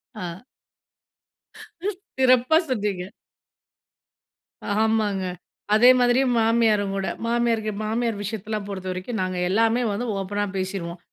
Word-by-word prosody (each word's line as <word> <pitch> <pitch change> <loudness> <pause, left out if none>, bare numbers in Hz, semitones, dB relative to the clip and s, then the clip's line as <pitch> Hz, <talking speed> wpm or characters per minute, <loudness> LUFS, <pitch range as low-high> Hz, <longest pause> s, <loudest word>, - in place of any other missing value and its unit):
ஆ. 180 0 -6 1.2
ம். - - -13 0.5
சிறப்பா, 255 +3 +4
சொன்னீங்க. 205 -6 -1 1.8
ஆமாங்க. 215 -4 +1 0.5
அதே 240 +4 +7
மாதிரியும் 245 +1 +3
மாமியாருங்கூட, 215 -4 +2 0.2
மாமியார்க்கு 230 -2 +1
மாமியார் 225 -1 -1
விஷயத்தலாம் 215 0 -4
பொறுத்த 190 -2 -6
வரைக்கும், 185 +4 -4
நாங்க 185 -1 -2
எல்லாமே 225 +4 +2
வந்து 225 +5 -2
ஓப்பனா 205 +2 -2
பேசிருவோம். 185 -2 -4
215 Hz, 95 wpm, -24 LUFS, 195-235 Hz, 1.8 s, அதே